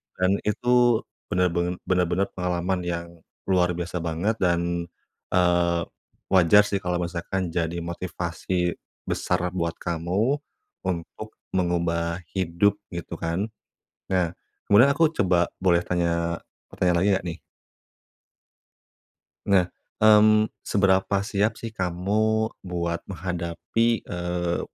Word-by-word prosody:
dan 95 +2 +2
itu 120 +2 +3 0.2
benar-ben 90 0 +1
benar-benar 90 +1 +1
pengalaman 90 +1 -1
yang 85 0 -4 0.3
luar 90 -1 +3
biasa 90 +1 -3
banget 85 +7 -1
dan, 85 -1 0 0.5
eee, 85 -1 +3 0.5
wajar 95 +2 +6
sih 105 -1 -1
kalau 90 -1 -1
misalkan 85 +1 -3
jadi 85 0 -2
motivasi 85 0 -2 0.3
besar 90 0 -1
buat 85 -2 -2
kamu 90 - -1 0.5
untuk 95 +5 -5 0.2
mengubah 85 -1 0
hidup, 95 +2 +1 0.2
gitu 85 - -5
kan. 85 +4 -1 0.7
Nah, 90 -3 +2 0.4
kemudian 120 +8 +7
aku 160 +3 +4
coba 90 -3 +3
boleh 90 -2 +3
tanya, 85 -1 0 0.3
pertanyaan 90 -1 +1
lagi 95 - +3
enggak 90 - -5
nih? - - -11 2.1
Nah, 95 -3 +5 0.4
mmm, 110 0 +7 0.2
seberapa 95 0 +2
siap 105 +2 0
sih 115 -1 -7
kamu 105 +4 0
buat 85 -2 -3
menghadapi, 90 +5 -1
eee, 90 -1 -2
90 Hz, 105 wpm, -25 LUFS, 85-100 Hz, 2.1 s, kemudian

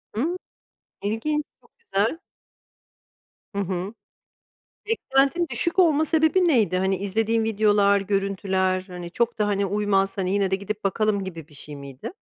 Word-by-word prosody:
Hıı. 330 +10 -1 0.7
İlginç, 260 +9 -1 0.2
çok 470 - -26
güzel. 275 - -1 1.4
Hı 200 - 0
hı. 190 +2 -3 1.0
Beklentin 335 -5 +2
düşük 340 +10 -1
olma 315 -4 +5
sebebi 320 +3 +3
neydi? 215 - +3
Hani, 190 0 +1
izlediğin 220 +3 0
videolar, 205 -2 +3
görüntüler, 195 -1 0
hani, 175 -1 -7
çok 235 +4 -1
da, 210 - +2
hani, 200 -1 +1
uymaz, 195 -1 0
hani, 185 -1 0
yine 195 -1 +1
de 190 - +2
gidip 205 +2 -6
bakalım 200 0 +1
gibi 165 -4 -8
bir 150 - -18
şey 145 0 -9
miydi? 140 - -8
205 Hz, 140 wpm, -24 LUFS, 190-240 Hz, 1.4 s, olma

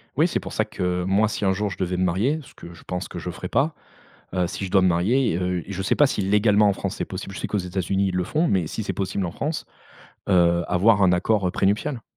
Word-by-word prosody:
Oui, - - +4
c'est - - -1
pour - - -8
ça - - +1
que 90 0 -2
moi, 100 +4 +2
si 105 - -3
un 95 - +3
jour 105 +2 -1
je 95 - -7
devais 90 -1 -2
me 90 - +1
marier- 105 - +1
ce - - -17
que 85 - -11
je 85 - -15
pense 90 +1 -4
que 90 - -7
je 90 - -5
ferais 90 +1 -6
pas- 150 +3 +1 0.6
heu, 90 -1 +1
si 90 +3 -5
je 95 - -5
dois 95 - +5
me - - +4
marier, 100 +5 +2
heu, 90 -1 -1
je 100 -1 -4
sais 95 - +1
pas 145 - +5
si 120 -6 -2
légalement, 105 +1 +4
en - - +3
France, 100 +1 -4
c'est - - -2
possible. 95 +1 -7
Je - - -6
sais - - -2
qu'aux 105 - -1
États-Unis 95 +1 -1
ils 95 - -3
le 90 0 0
font, 155 - 0
mais 90 -4 +1
si 110 - -4
c'est 100 - -3
possible 95 -1 -2
en - - -4
France, 155 - -3 0.7
heu, 85 -2 +4
avoir 100 +3 +3
un 95 -2 +5
accord, 95 +2 +1
heu, - - -1
prénuptial. 110 +7 0
95 Hz, 275 wpm, -23 LUFS, 90-105 Hz, 0.7 s, dois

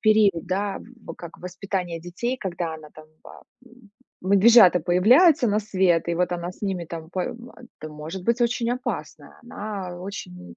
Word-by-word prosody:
период, 215 -5 +3
да, 195 +2 -2 0.3
в - - -7
как 170 -1 -11
воспитание 180 -1 -4
детей, 180 +10 -4
когда 175 -6 -4
она 155 -1 -12
там, 155 0 -14 0.2
а, - - -13 0.2
м, 240 -3 -20 0.3
медвежата 200 0 +6
появляются 245 - +5
на 210 +1 +1
свет, 185 -5 +1
и 170 - 0
вот 180 +1 0
она 175 0 -4
с - - -22
ними 190 -4 -2
там 160 -1 -8
пом 235 +7 -5 0.3
это 155 - -7
может 155 +5 -7
быть 235 +5 +1
очень 235 0 0
опасная. 250 +1 -5
Она 205 -6 -6
очень 90 - -9
185 Hz, 165 wpm, -24 LUFS, 170-215 Hz, 0.3 s, медвежата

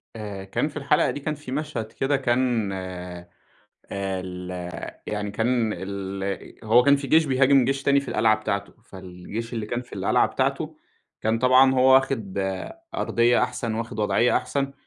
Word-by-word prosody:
آآ، 105 -3 -6
كان 95 +9 -1
في 150 - -8
الحلقة 145 +1 +2
دي - - -5
كان 150 +2 -3
في 145 -3 -10
مشهد 140 -6 -3
كده 135 +4 0
كان 120 -5 +1
آآ، 90 -2 -7 0.6
ال 95 -2 -4 0.6
يعني 105 -1 -3
كان 115 +1 +1
ال 100 0 -5
أ 100 +2 -5
هو 115 +3 +6
كان 140 +3 +5
في 140 0 -5
جيش 160 +4 +5
بيهاجم 135 -1 +4
جيش 135 +2 -1
تاني 140 0 +4
في 140 - -9
القلعة 110 -1 +3
بتاعتة، 100 -2 -3
فالجيش 95 +5 -8
اللي 110 -3 -3
كان 120 +3 -3
في 125 - -22
القلعة - - +2
بتاعتة - - -2 0.4
كان 110 +1 +1
طبعًا 130 +2 +6
هو 130 0 +6
واخِد 115 -7 +1 0.6
أرضيّة 120 +1 +2
أحسن، 115 -2 -2
واخِد 115 0 -5
وضعيّة 115 +3 +3
أحسن، 140 -1 -2
115 Hz, 165 wpm, -24 LUFS, 100-135 Hz, 0.6 s, هو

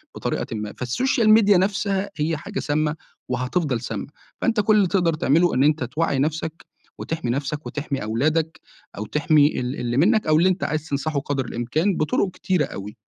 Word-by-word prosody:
بطريقةٍ - - -2
ما، 105 -1 -5
فالSocial 235 - +1
Media 205 -2 +3
نفسها 195 +1 0
هي 155 +1 0
حاجة 200 +6 -5
سامّة 150 +1 0 0.3
وهتفضل 125 +1 -1
سامّة، 125 - -5 0.3
فأنت 230 -2 +1
كُلّ 210 +1 +3
اللي 200 -3 +4
تقدر 175 -3 +1
تعملُه 160 +3 +2
إن 130 - +3
أنت 150 -1 +2
توّعي 140 +3 -1
نفْسك 160 +2 -2 0.3
وتحمي 160 -7 -3
نفْسك 145 +3 -3
وتحمي 145 -2 -4
أولادك، 155 +9 0 0.4
أو 105 - -4
تحمي 150 +3 +3
ال 125 +2 -3
اللي 120 0 -2
مِنّك، 215 - +3
أو 155 0 +4
اللي 175 +4 +4
أنت 185 +1 -1
عايز 155 0 -2
تنصحُه 145 +1 -1
قدر 140 -2 -2
الإمكان 150 - -1
بطُرق 155 +5 0
كتيرة 180 -3 0
أوي. 105 +3 -8
155 Hz, 175 wpm, -23 LUFS, 135-180 Hz, 0.4 s, اللي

